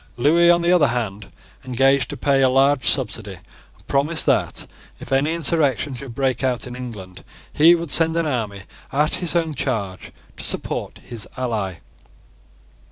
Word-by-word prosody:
Lewis, 170 +7 +4
on 175 0 +3
the 170 - +2
other 165 -5 +4
hand, 105 -4 -3 0.4
engaged 135 +1 +2
to - - -6
pay 135 +1 +2
a 130 - +4
large 135 0 +2
subsidy, - - -1 0.4
and - - -25
promised 150 +4 +1
that, - - 0 0.3
if - - -11
any 135 +4 +2
insurrection 150 -4 0
should 125 -2 -9
break 135 -1 -1
out 125 -2 -1
in 125 0 -8
England, 105 -8 -9 0.3
he 165 +3 +6
would 170 -3 -5
send 165 +2 +4
an 165 - +1
army 110 -9 -3 0.3
at 150 +3 +1
his 175 -3 +1
own 165 -2 0
charge 105 -9 -3 0.3
to - - -8
support - - -3
his 115 -3 -4
ally. 110 -7 -2
135 Hz, 165 wpm, -21 LUFS, 120-155 Hz, 0.4 s, he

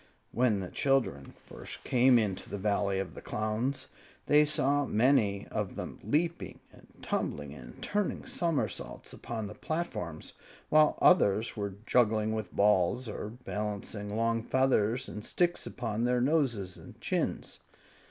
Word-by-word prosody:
When 115 -4 +2
the 90 - -6
children 135 - 0
first - - -9
came 125 0 +5
into 105 -5 -1
the - - -4
Valley 100 -1 0
of 95 -1 -3
the - - -9
Clowns, 110 +6 -2 0.4
they 150 +1 +6
saw 145 -1 +2
many 110 -5 +2
of - - -3
them - - -6
leaping 160 - -1
and - - -17 0.2
tumbling 75 -1 -2
and 65 -4 -12
turning 205 -2 -1
somersaults 165 -4 -2
upon 115 -2 -5
the 105 - -7
platforms, 105 - -4 0.4
while 155 0 +5
others 110 - +4
were 100 -3 -3
juggling 110 -3 +2
with 110 -4 -4
balls, 105 +4 +2
or 105 -1 -5
balancing 105 -2 -5
long 115 0 +1
feathers 125 -1 +1
and 105 - -7
sticks 175 +6 0
upon 115 -1 -2
their 125 0 +2
noses 120 - +1
and - - -13
chins. - - -2
110 Hz, 140 wpm, -30 LUFS, 100-130 Hz, 0.4 s, they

